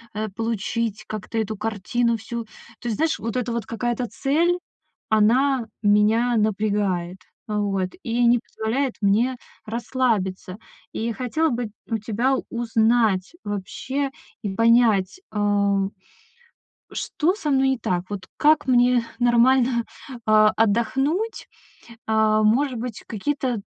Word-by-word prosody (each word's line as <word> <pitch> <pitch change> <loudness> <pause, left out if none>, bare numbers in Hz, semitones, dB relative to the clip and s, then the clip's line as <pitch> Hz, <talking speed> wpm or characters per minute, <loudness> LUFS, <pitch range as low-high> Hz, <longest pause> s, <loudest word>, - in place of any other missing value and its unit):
э, 215 +1 -2
получить, 225 0 -2
как-то 215 +1 -5
эту 220 -1 -1
картину 225 +3 0
всю. 235 +2 -5
То 225 +1 -19
есть, 220 - -1
знаешь, 320 0 +1
вот 230 +2 -3
эта 245 -1 -1
вот 235 -4 -3
какая-то 240 +1 -2
цель, 335 +9 +1 0.5
она 235 +3 +3 0.2
меня 215 +4 +3
напрягает, 200 -4 0 0.3
вот, 200 -3 -1
и 240 0 +1
не 240 0 +5
позволяет 245 +4 -2
мне 225 +6 +2 0.3
расслабиться. 220 -5 -1 0.4
И 230 +1 -2
хотела 265 +7 0
бы 235 -4 -3 0.2
у 225 - 0
тебя 235 +5 0
узнать 225 - +1
вообще 260 +7 -3 0.3
и 195 -2 -2
понять, 230 - +3
э 205 -1 +2 1.1
Что 345 +5 0
со 305 -8 -3
мной 265 0 +3
не 260 - 0
так? 180 -4 -1
Вот 190 -2 -5
как 300 -1 +4
мне 245 -1 +4 0.2
нормально, 240 0 +4 0.4
а, 215 0 +6
отдохнуть? 270 - 0 0.6
Э, 220 0 +3
может 250 +4 +2
быть, 240 -3 -6
какие-то 250 0 -2
230 Hz, 120 wpm, -23 LUFS, 210-250 Hz, 1.1 s, а